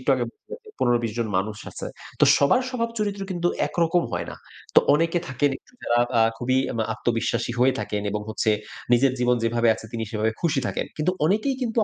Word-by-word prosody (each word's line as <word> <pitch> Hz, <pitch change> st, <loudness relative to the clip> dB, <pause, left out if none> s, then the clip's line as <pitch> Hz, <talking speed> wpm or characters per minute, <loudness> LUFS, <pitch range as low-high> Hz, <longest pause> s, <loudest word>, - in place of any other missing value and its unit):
একটু -, -, +4 dB
আগে 125 Hz, -2 st, -1 dB, 0.5 s
১৫-২০ 120 Hz, -2 st, +1 dB
জন 115 Hz, -, 0 dB
মানুষ 105 Hz, +2 st, -3 dB
আছে। -, -, -6 dB, 0.3 s
তো -, -, +8 dB
সবার 250 Hz, -, +4 dB
স্বভাব 230 Hz, -3 st, -1 dB
চরিত্র 205 Hz, -1 st, -2 dB
কিন্তু 175 Hz, -1 st, 0 dB, 0.2 s
একরকম 170 Hz, 0 st, +1 dB
হয় -, -, -2 dB
না। -, -, -8 dB, 0.4 s
তো -, -, +9 dB
অনেকে 165 Hz, +3 st, +2 dB
থাকেন 140 Hz, +3 st, +1 dB
একটু -, -, -27 dB
যারা 120 Hz, 0 st, +2 dB
বা 120 Hz, -, -1 dB
আ -, -, +7 dB, 0.2 s
খুবই 130 Hz, +1 st, +1 dB, 0.2 s
এম 115 Hz, -, -5 dB
আ -, -, -1 dB
আত্মবিশ্বাসী 115 Hz, 0 st, -1 dB
হয়ে 130 Hz, +1 st, +4 dB
থাকেন 105 Hz, -1 st, -3 dB
এবং 105 Hz, 0 st, -2 dB
হচ্ছে 110 Hz, 0 st, 0 dB, 0.4 s
নিজের 130 Hz, +2 st, +5 dB
জীবন 125 Hz, 0 st, +3 dB
যেভাবে 115 Hz, 0 st, +2 dB
আছে, 110 Hz, -, -11 dB
তিনি 115 Hz, -1 st, -2 dB
সেভাবে 110 Hz, 0 st, 0 dB
খুশি 155 Hz, -5 st, +1 dB
থাকেন। -, -, -2 dB
কিন্তু 155 Hz, +4 st, +1 dB
অনেকেই 215 Hz, -, +2 dB
কিন্তু, 230 Hz, -1 st, 0 dB
130 Hz, 205 wpm, -24 LUFS, 115-175 Hz, 0.5 s, তো